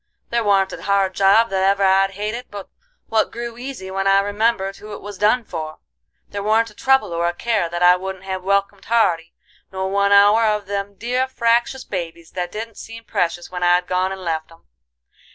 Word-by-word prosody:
There 235 0 +1
warn't 195 -2 +2
a - - -8
hard 195 -1 +1
job 200 +4 +4
that 190 -1 0
ever 195 +1 +2
I'd 195 0 +4
hated 215 +4 -4
but 200 -1 -8 0.4
what 220 -1 +1
grew 235 0 -6
easy 245 -6 -7
when 195 +1 -1
I 195 0 +5
remembered 205 -1 0
who 210 0 -10
it - - -7
was 205 -1 -8
done 220 +4 +3
for; 155 -6 -6 0.5
there 205 - -5
warn't 220 +2 +2
a - - -18
trouble 265 -4 +2
or 170 0 0
a 175 - -2
care 215 -5 0
that 175 +1 -2
I 180 0 +7
wouldn't 190 0 -6
have 190 -1 -4
welcomed 200 +1 -1
hearty, 175 -8 +1 0.4
nor 190 0 -3
one 200 0 +2
hour 205 +3 +6
of 210 -2 +1
them 200 0 -4
dear 250 +5 -1
fractious 240 +1 +1
babies 170 -3 -6
that 175 -1 -4
didn't 225 0 -7
seem 225 0 -10
precious 175 -4 -2
when 180 -1 -5
I'd 175 0 +3
gone 185 +1 0
and 190 0 -6
left 160 -1 -3
'em. 165 - -19
200 Hz, 205 wpm, -20 LUFS, 185-225 Hz, 0.5 s, I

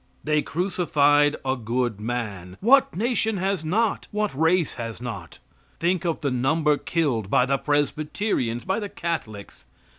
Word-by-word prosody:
They 150 0 +2
crucified 145 -4 +2
a 130 0 +1
good 120 -2 -2
man. 105 -6 -4
What 265 +1 +4
nation 220 0 0
has 190 -2 -1
not? 210 +7 0
What 210 -3 -1
race 160 +3 +2
has 115 -2 -6
not? 105 -9 -7 0.4
Think 180 +2 0
of 165 -2 -1
the 140 -3 0
number 150 +4 +2
killed 135 - -1
by 125 - +4
the 135 +1 0
Presbyterians; 145 - -1
by 190 +3 0
the 205 -2 -5
Catholics. 115 - -5
150 Hz, 145 wpm, -24 LUFS, 120-180 Hz, 0.4 s, What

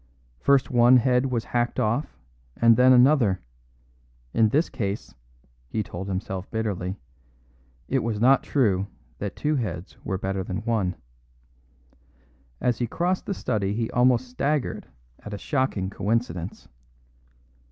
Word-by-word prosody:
First 140 - +3
one 120 +1 +6
head 125 +2 +2
was 120 -3 -1
hacked 120 +1 -1
off, 115 - -1 0.4
and 115 -1 +6
then 125 +2 +6
another; 125 -6 +5 0.9
in 110 -1 +4
this 150 +9 +2
case 100 -4 -4 0.6
(he 110 - -1
told 95 0 -7
himself 95 0 -4
bitterly) 100 -4 -3 0.9
it 135 - +1
was 115 -3 -2
not 130 +4 +5
true 100 -8 +1 0.3
that 100 -1 -4
two 150 0 0
heads 95 -6 -5
were 95 - -2
better 95 0 -2
than 95 +3 -4
one. 105 -6 0 1.6
As 120 -2 0
he 120 - 0
crossed 180 +8 -1
the 200 - -1
study 105 - -1
he 115 0 -2
almost 125 0 +3
staggered 140 +3 -2 0.3
at 105 -1 -7
a - - -6
shocking 130 -8 -1
coincidence. 100 -4 -2
115 Hz, 130 wpm, -25 LUFS, 100-130 Hz, 1.6 s, one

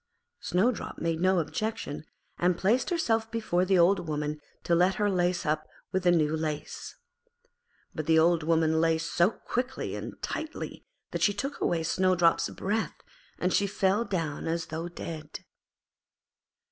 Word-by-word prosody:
Snowdrop 210 +7 0
made 165 -1 -1
no 185 +1 +3
objection, 175 -2 -3 0.3
and 175 0 +2
placed 230 - +2
herself 225 -11 +1
before 215 -6 0
the 190 0 +3
Old 175 0 +4
Woman 150 0 -2 0.2
to 170 - +1
let 180 +3 +4
her 205 -1 +1
lace 180 -1 +1
her 155 0 +1 0.3
with 190 - +1
the 175 - +6
new 155 -2 +2
lace. 155 -2 -4 1.0
But 155 -2 -4
the 160 0 +5
Old 165 +1 +4
Woman 160 0 +2
laced 165 0 +1
so 175 +2 +4
quickly 250 +3 -3
and - - -7
tightly 315 0 -5 0.2
that - - -3
she 205 - +3
took 275 +7 -4
away 165 -2 +1
Snowdrop's 180 0 +3
breath 215 +3 -2 0.4
and 180 +1 0
she 200 - +3
fell 200 +2 +1
down 165 -10 -3
as 165 0 -1
though 165 +2 -3
dead. 155 -3 -7
175 Hz, 150 wpm, -28 LUFS, 160-200 Hz, 1.0 s, the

